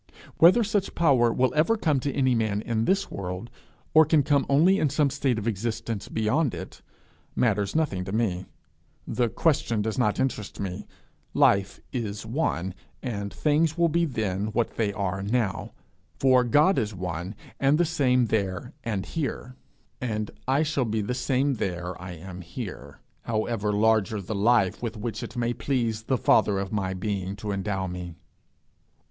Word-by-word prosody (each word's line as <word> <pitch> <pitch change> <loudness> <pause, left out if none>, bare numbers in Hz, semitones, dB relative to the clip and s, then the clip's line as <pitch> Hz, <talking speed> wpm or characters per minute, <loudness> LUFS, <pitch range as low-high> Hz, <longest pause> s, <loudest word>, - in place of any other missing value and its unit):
Whether 185 +8 +7
such 205 -2 -1
power 130 -8 +4
will 130 +2 +1
ever 170 +10 +3
come 155 -9 +1
to 140 +2 -2
any 130 -2 +2
man 110 -2 0
in 115 -1 0
this 195 +1 +1
world, 95 +4 -5 0.4
or 155 - +8
can 155 -1 +3
come 140 0 +2
only 170 +8 +5
in 150 - +2
some 145 0 +2
state 135 -3 0
of 110 +1 -3
existence 115 0 -3
beyond 125 +6 0
it, - - -9 0.5
matters 105 -4 +1
nothing 140 -13 0
to 95 - -5
me: 95 -4 -1 0.6
the 120 -2 0
question 115 -7 +1
does 110 +3 -2
not 105 -4 +1
interest 115 -6 -2
me; 95 -2 -4 0.5
life 100 0 +3
is 110 -4 -3
one, 110 - -1 0.3
and 100 -6 -3
things 155 +2 +1
will 170 -1 +3
be 170 +2 +2
then 105 - -2
what 115 -1 0
they 110 -3 0
are 100 -1 -2
now; 105 0 -1 0.5
for 130 -2 +4
God 150 - +4
is 105 -2 -2
one 90 +2 -4 0.2
and 140 +2 +4
the 175 - +3
same 130 -6 +2
there 105 +3 -2
and 105 -4 -2
here; 135 -5 -4 0.5
and 110 -4 -2 0.2
I 135 +4 +3
shall 150 -4 0
be 110 -1 -1
the 105 +5 -2
same 135 +1 0
there 90 -2 -3
I 90 0 -6
am 90 +2 -9
here, 85 - -8 0.2
however 110 -2 -1
larger 110 0 +2
the 100 +3 -5
life 105 -2 +2
with 115 -2 -4
which 110 0 -4
it - - -7
may 120 0 0
please 120 -5 -1
the 130 +3 0
Father 105 -3 +3
of 95 0 -3
my 95 -3 -1
being 95 0 -3
to 105 +1 -5
endow 95 -1 -2
me. 90 -2 -6
115 Hz, 170 wpm, -26 LUFS, 100-135 Hz, 0.6 s, or